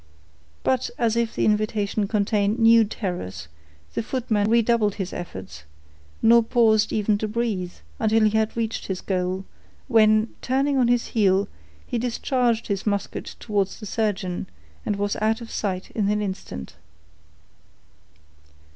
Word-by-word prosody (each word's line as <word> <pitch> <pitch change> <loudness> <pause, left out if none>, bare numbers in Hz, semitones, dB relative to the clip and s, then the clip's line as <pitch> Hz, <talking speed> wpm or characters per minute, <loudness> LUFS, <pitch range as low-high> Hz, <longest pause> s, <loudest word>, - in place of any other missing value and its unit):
But 260 -1 +1
as 230 -2 +1
if 235 -1 0
the - - +1
invitation 210 -1 +1
contained 205 0 +1
new 230 -1 +6
terrors, 135 - -5 0.5
the - - -1
footman 220 -4 0
redoubled 230 -2 +3
his 190 -3 -4
efforts, 95 - -7 0.6
nor 235 +1 +7
paused 220 -2 +3
even 210 -1 +1
to 215 - -1
breathe, 210 -5 -2 0.3
until 220 0 +3
he 215 - +4
had 220 +1 0
reached 225 -1 -2
his 190 -2 -3
goal, 185 0 -2 0.4
when, 215 -2 +4
turning 270 +2 +1
on 245 - +4
his 240 0 +1
heel, 200 -2 +2 0.4
he 240 - -2
discharged 240 -1 0
his 200 0 -3
musket 200 -1 -2
towards 200 -3 -1
the 215 - -8
surgeon, 200 -4 -2 0.4
and 210 - +1
was 205 0 -1
out 220 +1 +1
of 230 -1 -9
sight 190 -3 -3
in 205 -3 0
an 210 0 +1
instant. 190 - -5
215 Hz, 140 wpm, -24 LUFS, 200-230 Hz, 0.6 s, nor